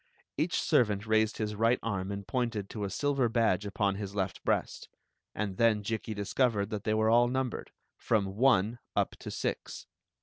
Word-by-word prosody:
Each - - 0
servant 105 -3 +2
raised 110 0 +2
his 105 -1 -2
right 115 +3 +2
arm 100 -4 -2
and 100 0 -5
pointed 115 -6 -2
to 105 -2 -3
a - - -3
silver 135 +3 +1
badge 110 -4 +1
upon 100 -1 0
his 100 -1 -6
left 95 -5 -2
breast; - - -1 0.5
and 100 -3 -3
then 110 -3 +3
Jikki 110 +1 -3
dis 100 -1 -5
covered 110 -5 +1
that 105 -2 -4
they 110 - +2
were 110 0 +3
all 120 +1 +5
numbered, 130 -1 -2 0.3
from 100 -4 0
"one" 120 -2 +3 0.2
up - - +1
to - - -7
"six." - - -4
110 Hz, 180 wpm, -30 LUFS, 100-115 Hz, 0.5 s, all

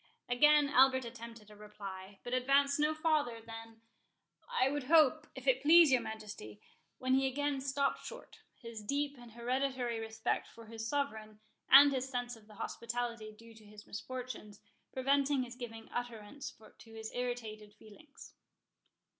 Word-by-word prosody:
Again 295 +4 +5
Albert 260 -2 +4
attempted 230 -2 -10
a - - -13
reply, 200 -2 -9
but 245 - -5
advanced 275 +3 +3
no 300 +1 +2
farther 305 -7 +1
than, 225 0 -11 0.7
"I 255 - +2
would 285 -1 -2
hope, 310 0 +5
if - - -9
it - - +3
please 325 0 +7
your 255 -2 +4
Majesty"—when 210 - -6
he 265 0 +3
again 280 +1 -1
stopped 275 +1 -1
short, - - -10 0.2
his 230 -3 -8
deep 285 +6 -1
and 240 -2 -13
hereditary 250 0 -1
respect 220 0 -2
for 230 - -14
his 225 0 -6
sovereign, 220 -7 -3 0.3
and 280 +2 +9
his 265 -1 -2
sense 245 -1 -3
of 215 -2 -18
the 215 - -15
hospitality 235 -1 -4
due 230 +2 -15
to 220 -1 -17
his 210 0 -14
misfortunes, 245 -3 -7 0.3
preventing 275 +1 +2
his 240 -1 -8
giving 225 -3 -8
utterance 245 +2 -5 0.3
to 225 - -15
his 220 0 -6
irritated 225 -4 -4
feelings. 220 +8 -15
245 Hz, 150 wpm, -34 LUFS, 220-275 Hz, 0.7 s, and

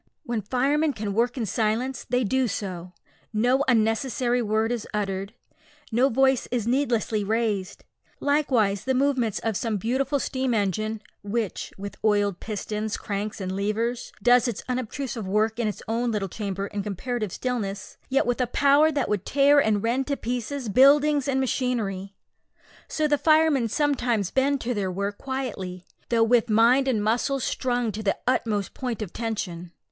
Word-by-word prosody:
When 240 -6 -2
firemen 280 +8 +1
can 210 -3 -4
work 240 +4 +1
in 235 - -1
silence 230 +5 -1
they 250 0 +2
do 260 +4 +1
so. 185 -4 -5 0.4
No 245 +5 +2
unnecessary 240 +1 +1
word 220 +1 0
is 240 -3 -3
uttered, 195 +1 -3 0.6
no 250 +4 +3
voice 265 +1 +2
is 240 -4 -1
needlessly 235 -4 +1
raised. 210 -2 -1 0.4
Like 290 +1 +1
the 220 0 +1
movements 260 -5 +1
of 225 -2 -2
some 220 +1 -1
beautiful 260 +7 0
steam 260 -2 -1
engine, 215 +2 -1 0.2
which, 205 0 -3
with 200 +1 -7
oiled 205 -3 +2
pistons, 215 0 -3
cranks, 205 +1 -4
and 190 -1 -3
levers, 225 +4 -2
does 245 0 +5
its 235 -4 -4
unobtrusive 250 -3 -3
work 215 +3 +1
in 235 - +1
its 210 - -4
own 235 +2 0
little 210 -3 -1
chamber 195 0 -4
in 205 0 -4
comparative 210 +2 -3
stillness, 205 -6 -4
yet 270 +1 +2
with 245 +1 0
a 250 - +1
power 285 +5 +4
that 285 -2 -1
would 205 -3 -1
tear 285 +3 +4
and 215 -6 +2
rend 250 +4 0
to 280 -1 -1
pieces 245 +2 -3
buildings 285 +5 +5
and 265 -1 +1
machinery, 220 -7 -1 0.7
so 310 -1 0
the 290 -1 +2
firemen 310 -4 +4
sometimes 245 - 0
bend 275 +1 +2
to 245 +1 -1
their 200 -4 -1
work 200 +2 -3
quietly, 205 -10 -5 0.2
though 230 -1 +3
with 235 0 +3
mind 235 +5 +4
and 225 -6 +1
muscles 245 +5 0
strung 245 -3 -1
to 210 +2 -5
the 200 -2 0
utmost 215 -5 0
point 245 -4 -3
of 190 - -9
tension. 180 -7 -4
230 Hz, 160 wpm, -25 LUFS, 210-260 Hz, 0.7 s, does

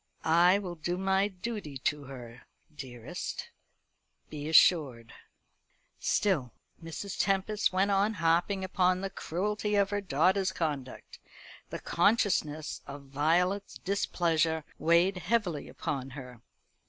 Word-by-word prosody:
"I 175 +4 +5
will 190 -4 -5
do 175 +2 -3
my 190 +1 +2
duty 195 - -6
to 145 +2 -2
her, 125 -3 -11 0.3
dearest, 130 +3 -6 0.8
be 150 0 -5
assured." 140 -8 +4 0.9
Still 155 - +1 0.3
Mrs. 165 +4 -6
Tempest 195 +2 +1
went 190 +2 +2
on 200 +3 +2
harping 175 +3 +1
upon 185 0 +1
the 195 0 -4
cruelty 210 +6 -2
of 200 0 +2
her 205 0 -1
daughter's 190 +3 +2
conduct. 145 -7 -4 0.5
The - - -4
consciousness 160 -9 +1
of 140 -1 -9
Violet's 180 +8 +1
displeasure 165 -5 0 0.2
weighed 170 +4 +3
heavily 180 -6 -1
upon 135 0 -4
her. 125 -4 -10
175 Hz, 115 wpm, -30 LUFS, 145-195 Hz, 0.9 s, I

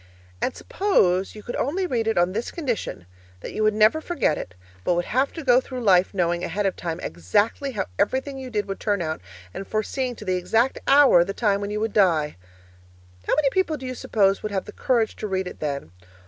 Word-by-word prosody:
And 260 - -1
suppose 195 - +1
you 210 - -10
could 240 - -5
only 350 +9 0
read 235 -9 -1
it 225 - +1
on 175 +1 +3
this 225 +5 -3
condition: 245 - -3 0.4
that - - -7
you - - -2
would 215 0 +3
never 215 +9 +4
forget 330 - 0
it, 90 - -7 0.3
but 175 - +2
would 175 0 0
have 260 +4 +1
to 325 - -6
go 250 -1 +5
through 255 -1 -6
life 185 -3 +4
knowing 175 -3 0
ahead 205 0 -2
of 195 - 0
time 170 -1 -4
exactly 205 - 0
how 210 - -1
everything 270 +1 0
you 260 -1 -7
did 210 -3 -2
would 195 - -5
turn 205 -4 0
out, 155 -1 -3 0.3
and 195 - -6
foreseeing 245 +4 -2
to 210 - -10
the 185 -1 +1
exact 225 +8 +1
hour 275 -11 +7
the 195 +3 -5
time 205 -3 +1
when 200 - -3
you 210 0 -2
would 220 0 -2
die. 165 -7 +3 0.9
How - - +3
many 290 -2 +2
people 335 -3 +1
do 265 - -9
you 255 - -3
suppose 195 -5 +1
would 215 - -4
have 190 -2 -2
the - - -8
courage 235 -4 0
to 215 - -4
read 190 -1 -1
it - - -9
then? 140 - -4
215 Hz, 225 wpm, -24 LUFS, 185-255 Hz, 0.9 s, hour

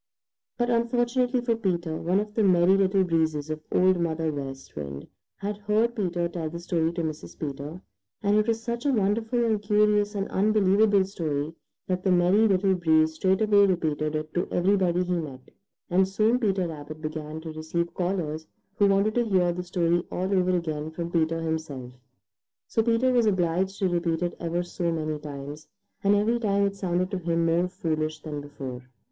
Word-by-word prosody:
But 240 0 +1
unfortunately 240 +2 +1
for 235 -1 +1
Peter, 175 -7 -1
one 180 +5 +1
of 210 0 -4
the 220 - +1
Merry 185 -1 +5
Little 195 0 +3
Breezes 160 -3 0
of 155 0 -4
Old 185 0 +3
Mother 160 -1 -1
West 135 -2 -7
Wind 70 -1 -6 0.3
had 205 +1 -4
heard 215 +3 +1
Peter 175 -5 -1
tell 170 -2 -4
the 170 +2 -7
story 170 -1 0
to 170 -1 -2
Mrs. 155 -1 -6
Peter, 145 +3 -5 0.4
and 205 0 +3
it 215 +1 +3
was 225 0 0
such 235 0 -3
a - - +3
wonderful 225 +2 +1
and 220 -2 +1
curious 210 0 +2
and 195 -1 -1
unbelievable 205 0 +3
story 155 -5 -3 0.3
that 185 -1 -1
the 190 - +2
Merry 180 +5 +4
Little 195 -1 +3
Breeze 160 -3 +3
straightway 200 +4 +3
repeated 155 -4 -1
it 155 0 -4
to 175 - -1
everybody 180 -1 +2
he 180 0 -2
met, 135 -5 -8 0.4
and 185 +1 +3
soon 215 +5 +2
Peter 195 -6 +1
Rabbit 155 -1 -8
began 155 0 -5
to 160 0 -7
receive 165 +2 -3
callers 170 -4 -2 0.3
who 205 - +5
wanted 200 +2 +2
to 240 0 +1
hear 180 -4 +2
the 180 - -4
story 175 -1 +1
all 185 +2 -1
over 185 -1 +2
again 155 -2 -3
from 170 +1 -5
Peter 165 -1 +1
himself. 155 -6 -4 0.7
So 225 - +1
Peter 235 +3 +2
was 240 -3 +3
obliged 190 0 +1
to 195 - +1
repeat 170 -1 0
it 175 - -2
ever 170 +1 -1
so 175 -1 -2
many 155 -2 -2
times, 145 +1 -8 0.4
and 200 +1 +4
every 225 +4 +2
time 200 -3 +2
it 200 0 -1
sounded 185 -1 -1
to 190 - -2
him 170 -1 0
more 170 +2 +2
foolish 155 -3 -2
than 150 -2 -5
before. 135 -3 -7
180 Hz, 185 wpm, -26 LUFS, 160-205 Hz, 0.7 s, Merry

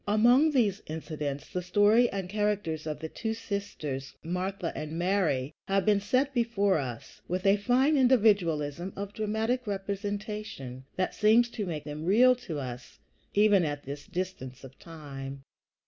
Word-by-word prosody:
Among 240 +9 +5
these 215 -9 +1
incidents 150 -3 -5
the 180 - -1
story 205 +6 +4
and 195 -2 -4
characters 200 -6 -1
of 150 -1 -3
the 160 - -3
two 220 +6 -3
sisters, 160 -11 -5
Martha 180 +1 -3
and 155 0 -5
Mary, 170 -7 +1
have 195 -1 +1
been 210 -2 +4
set 255 +7 +1
before 215 -7 +2
us 120 -4 -7
with 185 +2 -2
a 195 +1 +5
fine 255 +8 +3
individualism 190 - +2
of 200 0 -5
dramatic 220 +3 -1
representation 200 - -4
that 185 - -1
seems 225 +3 +4
to 210 -4 -4
make 155 -4 -4
them 150 +1 -6
real 240 +7 +6
to 170 -11 -6
us, 125 -3 -7 0.4
even 205 -2 +5
at 145 -2 -3
this 140 +1 -7
distance 170 -9 -5
of 135 0 -13
time. 140 -4 -8
195 Hz, 150 wpm, -29 LUFS, 150-215 Hz, 0.4 s, real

